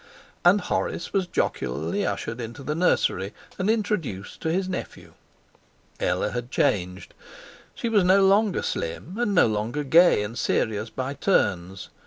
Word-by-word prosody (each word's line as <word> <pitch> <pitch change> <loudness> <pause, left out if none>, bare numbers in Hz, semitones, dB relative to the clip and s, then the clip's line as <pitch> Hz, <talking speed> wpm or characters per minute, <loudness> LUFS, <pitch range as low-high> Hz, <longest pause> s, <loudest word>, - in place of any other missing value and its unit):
And 185 +4 +5
Horace 170 - -2
was 190 -2 +1
jocularly 80 - -1
ushered 115 +2 -3
into 120 +5 -7
the 150 - -2
nursery 130 - +1 0.2
and 185 +3 0
introduced 200 - -2
to 160 - -1
his 185 +2 0
nephew. 185 - -6 0.9
Ella - - 0
had 120 0 -4
changed. 90 -4 -1 0.6
She 235 - -3
was 215 -4 +3
no 190 +2 +5
longer 200 +1 +3
slim, 115 - -4
and 210 -5 0
no - - +6
longer 110 +7 -1
gay 165 -5 +5
and 105 +3 -6
serious 110 -2 0
by 130 +3 -4
turns. 95 - 0
145 Hz, 145 wpm, -25 LUFS, -, 0.9 s, no